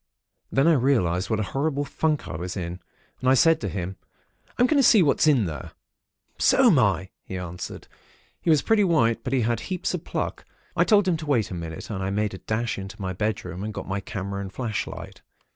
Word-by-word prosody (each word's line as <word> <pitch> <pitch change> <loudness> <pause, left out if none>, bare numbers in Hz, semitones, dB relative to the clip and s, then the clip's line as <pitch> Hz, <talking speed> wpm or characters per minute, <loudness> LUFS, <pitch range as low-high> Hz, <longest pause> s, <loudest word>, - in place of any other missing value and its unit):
Then 135 +4 +3
I 170 - +6
realised 115 - +2
what 110 -2 0
a - - +1
horrible 145 0 0
funk 155 0 -1
I - - -5
was 90 +4 -5
in, 90 0 -4 0.4
and 130 - +1
I 130 - +6
said 165 +5 +4
to 100 - -2
him:—'I'm 95 - -4
going 280 +2 +4
to - - +2
see 215 -6 +6
what's 145 - +3
there.' 105 - +1 0.7
"'So'm - - +5
I,' 95 0 +1
he 95 - -6
answered. 90 0 -7 0.5
He - - -1
was 155 -3 +4
pretty 220 -2 +3
white; 150 - +2
but 130 - -3
he 135 -2 +2
had 115 0 0
heaps 180 +11 -3
of 180 -2 -3
pluck. - - -3 0.3
I - - +3
told 205 -3 +4
him 175 -3 +2
to 155 -1 -8
wait 120 -8 +1
one 90 -2 -4
instant, 80 +5 -6
and 95 - -3
I 95 - -1
made 105 0 -1
a 95 - -7
dash 110 0 -2
into 95 +2 -8
my 95 -2 -3
bedroom, 95 -2 -3
and 110 0 -5
got - - -6
my 95 +1 -2
camera 100 0 -5
and 95 -1 -6
flashlight. 110 -2 -5
110 Hz, 210 wpm, -25 LUFS, 95-145 Hz, 0.7 s, I